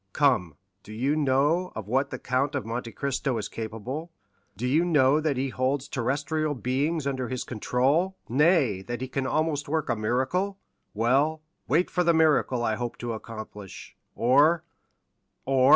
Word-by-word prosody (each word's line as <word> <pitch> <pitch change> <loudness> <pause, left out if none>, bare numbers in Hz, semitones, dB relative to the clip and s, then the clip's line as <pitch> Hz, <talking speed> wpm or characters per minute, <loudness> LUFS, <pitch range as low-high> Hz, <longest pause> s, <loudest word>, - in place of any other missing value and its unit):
Come—do 100 - -1
you 130 +7 0
know 150 +5 +2
of 110 -3 -6
what 135 +5 +1
the 130 - -5
Count 135 +4 -1
of 140 - -2
Monte 115 +1 -4
Cristo 135 -1 -1
is 105 - -3
capable? 115 +9 -6 0.5
do 120 - -3
you 145 +7 +3
know 150 -4 +4
that 150 -4 0
he 135 +1 0
holds 130 +2 -1
terrestrial 145 +4 -1
beings 140 +5 -1
under 130 -3 -2
his 130 -1 -3
control? 135 - 0
nay, 140 - +3
that 120 +5 -5
he 130 - -2
can 130 0 -2
almost 155 -1 0
work 155 -2 -1
a 120 - +2
miracle? 130 - 0 0.4
Well, 140 +8 +2 0.2
wait 165 +7 +2
for 180 - +1
the 170 -1 +3
miracle 150 -6 +3
I 110 -2 0
hope 120 -1 -4
to 120 -1 -4
accomplish, 110 -3 -9 0.2
or——" 145 +8 +4 0.8
"Or?" 130 0 +4
135 Hz, 160 wpm, -27 LUFS, 120-150 Hz, 0.8 s, know